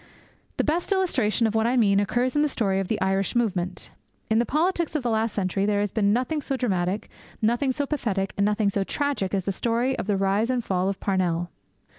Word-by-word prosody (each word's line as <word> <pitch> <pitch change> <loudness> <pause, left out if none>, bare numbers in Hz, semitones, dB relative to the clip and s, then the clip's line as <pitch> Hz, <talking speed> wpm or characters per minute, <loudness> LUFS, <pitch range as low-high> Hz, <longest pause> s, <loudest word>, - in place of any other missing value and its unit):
The - - +2
best 335 +6 -1
illustration 255 - +1
of 220 - 0
what 220 0 +2
I 250 +2 +1
mean 200 -4 +4
occurs 245 +6 0
in 295 - +3
the 300 - +2
story 195 -7 0
of 195 - -2
the 220 - -1
Irish 195 +2 0
movement. 185 -6 -1 0.4
In 220 - +4
the 235 - +1
politics 335 +1 0
of 295 - 0
the 240 - 0
last 220 0 +1
century 195 0 -1
there 205 -1 +2
has 205 -2 -1
been 205 -2 +2
nothing 255 +7 0
so 270 -1 -2
dramatic, 195 -4 -1 0.3
nothing 240 +5 +1
so 285 +2 -2
pathetic, 210 -10 -2
and 200 - +1
nothing 210 0 +2
so 200 -1 0
tragic 280 -5 -1
as 190 - -1
the 195 - 0
story 235 +6 0
of - - -4
the 205 -2 +1
rise 195 +4 +1
and 250 -2 0
fall 185 -1 0
of 195 - -4
Parnell. 175 -3 0
220 Hz, 225 wpm, -25 LUFS, 195-255 Hz, 0.4 s, mean